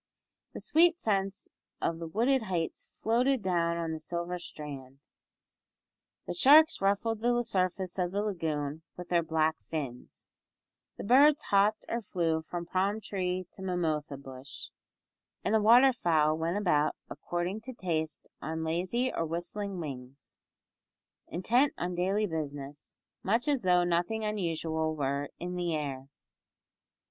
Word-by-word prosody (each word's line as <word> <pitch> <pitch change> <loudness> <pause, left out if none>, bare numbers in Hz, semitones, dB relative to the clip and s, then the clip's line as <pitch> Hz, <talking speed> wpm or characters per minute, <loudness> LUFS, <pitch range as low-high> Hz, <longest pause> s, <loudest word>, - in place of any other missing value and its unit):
The - - -6
sweet 335 +3 +4
scents 195 -1 -1 0.3
of 165 - -1
the 165 - -5
wooded 240 +10 +2
heights 180 -6 -3 0.2
floated 245 +2 +2
down 170 -2 +1
on 165 -1 -2
the 160 - -4
silver 170 +2 -4
strand; 140 -5 -9 1.3
the - - -3
sharks 315 +2 +6
ruffled 205 +3 +1
the 240 +1 +2
surface 185 -3 -1
of 180 -1 0
the 200 +2 -1
lagoon 160 -6 -2 0.2
with 180 -1 -8
their 175 -1 +3
black 160 -1 +1
fins, 135 -6 -6 0.7
the - - -6
birds 285 +7 +5
hopped 205 +2 +3
or 235 - -2
flew 165 -5 0
from 170 +2 -5
palm 190 +4 0
tree 185 -3 -2
to - - -13
mimosa 160 -6 -1
bush, 135 +1 -9 0.7
and - - 0
the 220 - +4
waterfowl 210 - +5
went 165 +4 -1
about 155 -7 +2
according 175 +5 -3
to 255 +4 -7
taste 160 -6 -3
on 160 +1 -3
lazy 185 +11 -1
or - - -1
whistling 175 +4 -4
wings, 135 -3 -8 0.9
intent 240 - +2
on 180 +1 -2
daily 190 +4 +1
business, 145 -4 -6 0.2
much 230 +7 +1
as 285 -4 +2
though 180 -2 +4
nothing 175 +6 0
unusual 160 -6 -1
were 140 0 -1
"in 180 +1 -5
the 175 -2 -1
air." 135 -3 -4
175 Hz, 135 wpm, -30 LUFS, 160-210 Hz, 1.3 s, sharks